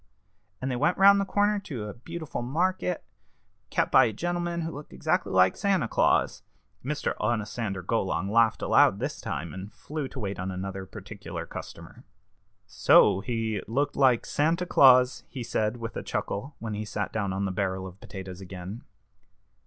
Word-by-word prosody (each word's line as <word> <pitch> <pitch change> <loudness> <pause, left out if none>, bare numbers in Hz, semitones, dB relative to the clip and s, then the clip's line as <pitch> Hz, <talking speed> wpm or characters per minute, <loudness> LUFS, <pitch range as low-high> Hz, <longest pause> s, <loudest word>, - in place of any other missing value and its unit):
And 130 +1 -2
they - - -1
went 150 +8 +1
round 200 +1 +7
the - - -1
corner 205 +1 +2
to 130 - -6
a 105 - -6
beautiful 160 +5 -6
market, 175 +7 -1 0.7
kept - - 0
by - - +7
a 110 - -1
gentleman 175 +5 -2
who 165 0 -3
looked 145 0 -10
exactly - - 0
like 95 0 +4
Santa 195 - +1
Claus - - +2 0.2
" - - -41
Mr. 150 +3 -1
Onosander 105 -3 -2
Golong 95 -3 -1
laughed 115 0 +3
aloud - - +5
this - - -4
time, 75 +2 -4
and 95 +3 -8
flew 150 -2 -5
to - - -9
wait 100 -2 -4
on 90 +1 -3
another 95 +1 -5
particular - - -8
customer. - - -10 0.6
"So 95 - +5
he 110 -2 -2
looked 140 +6 0
like 130 -4 +4
Santa 165 +4 +1
Claus?" 130 -6 +5
he 130 -3 -6
said, 110 0 -1
with 115 -2 -6
a - - -3
chuckle, 135 +9 -4
when 110 -2 -5
he 105 +1 -3
sat 105 -1 -4
down 100 -3 -1
on 95 +1 -1
the 95 - -1
barrel 95 -1 -2
of 95 +1 -10
potatoes 95 -2 -8
again. 95 +4 -8
115 Hz, 175 wpm, -27 LUFS, 95-150 Hz, 0.7 s, round